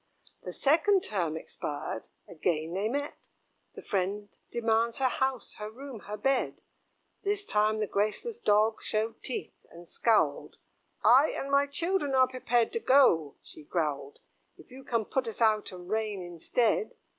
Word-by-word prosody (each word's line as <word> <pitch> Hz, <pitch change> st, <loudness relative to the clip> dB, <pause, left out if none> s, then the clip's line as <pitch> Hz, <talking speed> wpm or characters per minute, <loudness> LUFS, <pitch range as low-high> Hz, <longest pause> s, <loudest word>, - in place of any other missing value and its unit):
The -, -, -6 dB
second 340 Hz, +7 st, +3 dB
term 170 Hz, -6 st, -2 dB
expired, 145 Hz, -7 st, -5 dB, 0.2 s
again 160 Hz, -1 st, -2 dB
they 200 Hz, +4 st, 0 dB
met: 285 Hz, +3 st, -4 dB, 0.5 s
The -, -, -9 dB
friend 200 Hz, +1 st, -2 dB
demands 230 Hz, 0 st, +1 dB
her 265 Hz, -, +2 dB
house, 265 Hz, -1 st, -2 dB
her 210 Hz, 0 st, -5 dB
room, 260 Hz, +1 st, -9 dB
her 210 Hz, +1 st, -4 dB
bed. 270 Hz, +4 st, 0 dB, 0.6 s
This 405 Hz, 0 st, -1 dB
time 215 Hz, -, +2 dB
the 215 Hz, -, +1 dB
graceless 215 Hz, -, -2 dB
Dog 215 Hz, -, +3 dB
showed 220 Hz, +1 st, -2 dB
teeth, 255 Hz, -, -6 dB
and 170 Hz, +1 st, -13 dB
scowled; 225 Hz, +4 st, +1 dB, 0.5 s
"I 270 Hz, +5 st, +6 dB
and 275 Hz, -, -4 dB
my 280 Hz, 0 st, +4 dB
children 295 Hz, -1 st, -1 dB
are 260 Hz, 0 st, +5 dB
prepared 245 Hz, -2 st, 0 dB
to 460 Hz, -, 0 dB
go," 175 Hz, -, +4 dB
she -, -, -13 dB
growled, 150 Hz, -3 st, -2 dB, 0.4 s
"If -, -, -17 dB
you 265 Hz, +1 st, -11 dB
can 230 Hz, -4 st, -1 dB
put 260 Hz, +2 st, -1 dB
us 225 Hz, -, -6 dB
out 215 Hz, -3 st, +2 dB
and 180 Hz, -1 st, -10 dB
reign 210 Hz, -2 st, -2 dB
instead." 225 Hz, -, 0 dB
225 Hz, 155 wpm, -29 LUFS, 195-270 Hz, 0.6 s, I